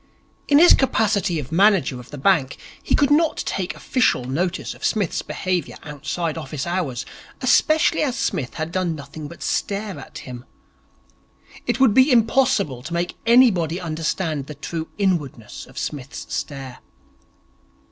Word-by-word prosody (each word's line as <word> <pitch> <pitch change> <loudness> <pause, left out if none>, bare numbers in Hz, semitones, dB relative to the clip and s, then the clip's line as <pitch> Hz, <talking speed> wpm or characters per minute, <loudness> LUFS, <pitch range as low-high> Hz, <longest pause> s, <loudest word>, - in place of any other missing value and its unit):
In 285 - +5
his 345 +3 +8
capacity 205 -8 +1
of 140 -1 -7
manager 185 -7 +3
of 125 - -12
the 145 - -8
bank 140 -3 +2 0.2
he - - +1
could 285 -1 +2
not 315 +2 +3
take 185 -2 -3
official 250 - +1
notice 170 +8 -2
of - - -15
Psmith's 205 -6 0
behaviour 180 -5 -2
outside 155 +2 -4
office 150 -2 -5
hours, 170 -8 -2 0.3
especially 310 +6 +3
as 265 -5 0
Psmith 125 -4 -2
had 160 +1 -3
done 180 -2 -1
nothing 145 +1 -8
but 170 - -10
stare 200 -5 -2
at 130 - -10
him. 125 -1 -8 1.2
It - - 0
would 260 -5 +5
be 260 +5 +5
impossible 230 - +2
to 155 +6 -7
make 175 +1 -2
anybody 190 - +4
understand 160 -3 -2
the 150 - -8
true 160 +3 -5
inwardness 155 - -2
of - - -16
Psmith's 140 -4 -6
stare. 135 -3 -5
170 Hz, 145 wpm, -22 LUFS, 145-215 Hz, 1.2 s, his